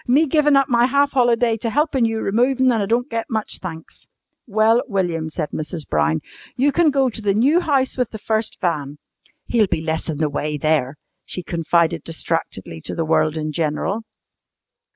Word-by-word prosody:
"Me 280 +6 +4
givin' 295 0 +3
up 275 -1 +4
my 240 0 +3
half 280 +2 +2
holiday 240 -2 +2
to 230 +1 -3
helpin' 280 -1 +1
you 225 -1 -1
removin', 255 +5 +2
an' 225 -3 +1
I 200 - -1
don't 240 +4 +1
get 230 -4 -4
much 220 -2 -3
thanks!" 165 -3 -9 0.4
"Well, 220 +2 +3
William," 175 -7 -1
said 155 -1 -4
Mrs. 155 0 -4
Brown, 75 +1 +1 0.4
"you 280 +3 +3
can 330 +2 +3
go 270 -2 +2
to 220 - -5
the 200 -2 +1
new 275 +10 +4
house 275 -7 0
with 250 - +1
the 220 - -7
first 220 +1 -2
van. 150 -5 -2 0.5
He'll 225 -4 +2
be 165 - -1
less 160 +1 -3
in 155 - -2
the 155 0 +1
way 150 +1 -3
there," 150 -2 0 0.3
she 180 - -7
confided 170 -1 0
distractedly 160 - -4
to - - -5
the 165 - -1
world 155 0 +1
in 155 0 -3
general. 165 +7 -1
215 Hz, 190 wpm, -21 LUFS, 160-250 Hz, 0.5 s, Me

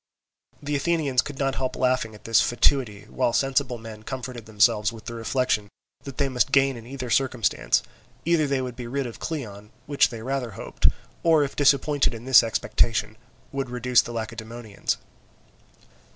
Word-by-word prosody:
The 145 0 -2
Athenians 145 -4 +1
could 145 -2 -8
not 135 -1 0
help 130 - -1
laughing 125 -4 0
at 105 - -17
his 115 -1 +4
fatuity, 120 -4 +1
while 120 - -1
sensible 135 -2 +1
men 110 -1 -10
comforted 125 -1 -7
themselves 105 0 +3
with 115 -2 -12
the 115 - -6
reflection 115 -2 -1 0.4
that 135 -2 -8
they 140 - +1
must 130 +1 +1
gain 135 -1 +4
in 115 -1 -10
either 130 -2 -6
circumstance; 130 -2 +1 0.4
either 165 -3 +3
they 135 -2 0
would 125 -1 -5
be 120 -1 -7
rid 135 +2 -2
of 120 - -8
Cleon, 105 -10 -6 0.2
which 145 -1 +3
they 115 -2 -8
rather 130 -1 -2
hoped, - - 0 0.3
or 160 -3 +4
if 140 - -4
disappointed 145 -2 +3
in 115 +1 -9
this 130 -2 +8
expectation, 115 0 0 0.4
would 135 -2 -3
reduce 125 0 +3
the - - -8
Lacedaemonians. 115 -1 -4
125 Hz, 165 wpm, -25 LUFS, 115-135 Hz, 0.4 s, this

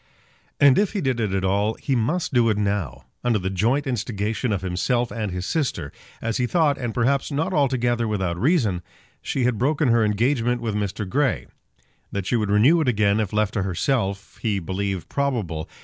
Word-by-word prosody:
And 140 +1 +6
if 205 -1 +1
he 200 - -1
did 130 -4 0
it 105 -4 0
at 95 0 -1
all, 100 +3 +1
he 135 - -2
must 150 +9 0
do 120 -2 +4
it 105 - +1
now. 100 -9 -2 0.2
Under 120 -3 +2
the 95 -1 -3
joint 120 - +1
instigation 115 -2 -2
of 95 -2 -1
himself 120 +7 0
and 110 -4 -3
his 90 0 -4
sister, 100 - -2 0.3
as 115 0 -1
he 125 - +1
thought, 155 -1 +2
and 120 -3 -2
perhaps 130 +5 +1
not 145 +3 -1
altogether 120 -5 +1
without 95 -5 -2
reason, 120 - +2 0.4
she 130 - -2
had 120 -3 +1
broken 145 +2 +2
her 115 -1 +4
engagement 120 +3 +1
with 115 -2 -3
Mr. 105 0 -2
Grey. 135 +4 0 0.7
That 100 -2 -3
she 120 - 0
would 105 -3 0
renew 125 +12 +5
it 150 - -1
again 105 -3 +2
if 105 -4 -1
left 105 -1 0
to 105 - 0
herself, 100 +1 -2
he 105 -4 0
believed 95 +1 -3
probable. 110 - -2
115 Hz, 195 wpm, -23 LUFS, 100-130 Hz, 0.7 s, And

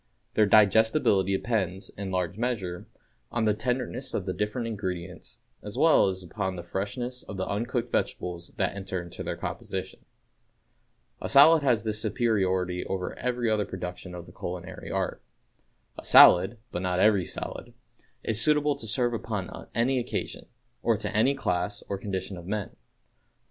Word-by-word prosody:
Their 105 -1 +4
digestibility 105 -1 +4
depends, 95 -5 -2
in 100 -1 -6
large 90 -1 -1
measure, 105 -7 -3 0.4
on 120 -2 0
the 105 - +4
tenderness 125 +3 -2
of 95 - -2
the 95 - -2
different 105 +4 -2
ingredients, 95 -5 -5 0.2
as 105 +3 -7
well 160 -6 +5
as 95 -1 -3
upon 95 +2 -3
the 85 - -6
freshness 110 +8 -4
of 100 - -8
the 95 - -2
uncooked 120 +3 -2
vegetables 90 0 -2
that 95 -1 0
enter 95 -2 -4
into 85 -1 -8
their - - -3
composition. - - -5 1.2
A - - -3
salad 150 +3 +8
has 125 -5 +2
this 110 -1 -1
superiority 95 -5 0
over 95 -1 -3
every 125 -1 -1
other 110 -1 +2
production 90 -1 -6
of 85 -1 -8
the - - -14
culinary 90 -1 -7
art: - - -2 0.8
A - - -9
salad 90 +7 +8
(but 90 - -3
not 90 -1 0
every 100 -4 +4
salad) - - -7 0.5
is 115 0 -1
suitable 150 +1 +3
to 115 - -8
serve 120 +3 +1
upon 105 -5 -4
any 125 +3 +2
occasion, 120 - -4 0.3
or 115 -2 +2
to 105 - -4
any 130 +6 +4
class 100 -4 -2
or 100 - -3
condition 95 -1 -4
of 85 0 -10
men. 105 0 -3
105 Hz, 160 wpm, -27 LUFS, 95-120 Hz, 1.2 s, salad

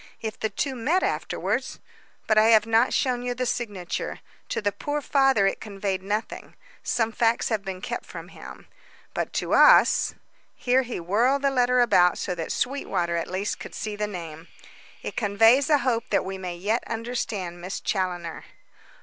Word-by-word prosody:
If 220 -1 -5
the 220 - -1
two 265 +7 -2
met 295 +10 +1
afterwards - - -2 0.5
But 215 - +2
I 215 0 +6
have 220 -2 +6
not 225 +2 +3
shown 250 -2 0
you 245 0 -3
the 255 +1 -2
signature. 205 -8 -3 0.3
To - - -1
the 205 -1 0
poor 290 +9 -3
father 270 -7 +3
it 195 - 0
conveyed 195 -2 -3
nothing 210 +3 -4 0.3
some 225 -1 0
facts 230 +1 +1
have 220 -4 -1
been 190 -1 -6
kept - - -5
from - - -9
him - - -12 0.5
but - - -2
to - - -1
us - - +6 0.2
" - - -38
here 255 +1 +2
he 245 -5 -5
whirled 235 +11 +1
the 275 - +3
letter 250 -1 +3
about 180 -7 +4
so 180 - -2
that 165 -2 -5
Sweetwater, 175 -10 -1
at 170 - -2
least, 190 +3 -3
could - - -9
see 215 -1 -4
the 210 0 -2
name, 165 -4 -8 0.6
"it - - -5
conveys 225 +6 +4
a 300 - +6
hope 235 -4 -1
that - - +1
we 190 0 -5
may 180 -2 -5
yet 210 +7 -1
understand 220 -6 -4
Miss 185 +2 -5
Challoner." 180 -4 -3
215 Hz, 180 wpm, -25 LUFS, 190-245 Hz, 0.6 s, I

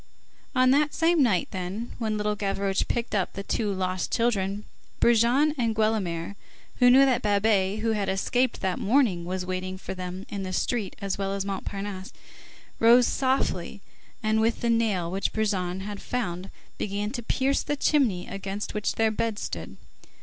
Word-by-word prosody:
On 255 0 +5
that 295 +2 +2
same 330 -1 +3
night, 205 -10 +2
then, 190 +5 -4
when 215 -2 -1
Little 210 0 0
Gavroche 195 -1 -1
picked 235 -1 -2
up 195 -3 0
the 195 - -5
two 210 0 -1
lost 185 -1 -2
children, 205 -3 0 0.3
Brujon 240 +6 +4
and 230 -2 +1
Guelemer, 200 -5 0 0.4
who 245 -1 +7
knew 265 +2 +7
that 260 -3 +2
Babet, 205 -1 +2
who 225 0 +1
had 205 -3 -1
escaped 245 +6 0
that 190 -2 -1
morning, 210 -7 +2
was 180 +1 -3
waiting 185 0 -3
for 190 - -6
them 185 +1 -6
in 200 -2 -5
the 185 -1 -4
street 215 -1 -1
as 200 -1 -3
well 195 0 -1
as 195 0 -2
Montparnasse, 195 0 -5 0.7
rose 240 +2 +7
softly, 260 -10 0 0.4
and 215 0 +2
with 225 +1 +1
the 235 - +2
nail 210 -7 +1
which 195 +1 -1
Brujon 190 -4 -1
had 205 0 -6
found, 190 -6 -3 0.3
began 205 +1 -2
to 240 - -4
pierce 265 +4 +1
the 290 - -2
chimney 255 -11 +2
against 195 +1 -5
which 210 -1 -1
their 225 -1 +2
beds 220 -1 -2
stood. - - -6
210 Hz, 170 wpm, -26 LUFS, 190-235 Hz, 0.7 s, who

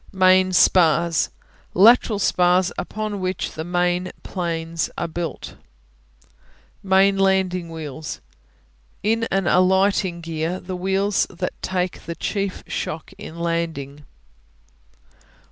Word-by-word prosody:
Main 185 -1 +4
Spars 170 -4 +3 0.5
Lateral 220 +2 +6
spars 180 -1 +2
upon 215 -1 -4
which 185 0 -2
the 160 - -6
main 175 +1 0
planes 165 -2 -3
are 170 - -2
built. 170 0 -6 1.2
Main 195 +1 +3
Landing 190 -3 +1
Wheels 155 -2 -6 0.8
In 225 +2 +1
an 195 -1 0
alighting 185 0 +2
gear, 165 +2 -3
the 185 +1 -6
wheels 195 +2 0
that 180 0 -4
take 180 -1 -3
the 170 - -4
chief 200 0 -3
shock 155 0 -5
in 165 - -9
landing. 165 -4 -3
180 Hz, 105 wpm, -22 LUFS, 170-190 Hz, 1.2 s, Lateral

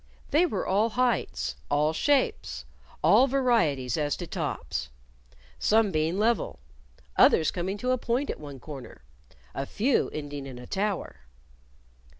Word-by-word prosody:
They 320 +5 +4
were 200 - -2
all 205 +4 +2
heights, 250 +1 0
all 150 +2 +2
shapes, 160 - 0 0.4
all 245 +6 +6
varieties 225 - +1
as 145 -2 0
to - - -5
tops 60 0 -4 0.7
some 215 -1 +3
being 160 +2 0
level, 225 - +1 0.6
others 160 - +5
coming 190 +3 -3
to 250 +5 -1
a 255 - +1
point 245 +5 0
at - - -8
one 145 -3 -9
corner, 135 -1 -10 0.5
a 135 0 -4
few 250 +5 +1
ending 145 -2 -6
in 130 -2 -8
a 125 - -9
tower. 200 +4 -2
190 Hz, 140 wpm, -27 LUFS, 145-235 Hz, 0.7 s, all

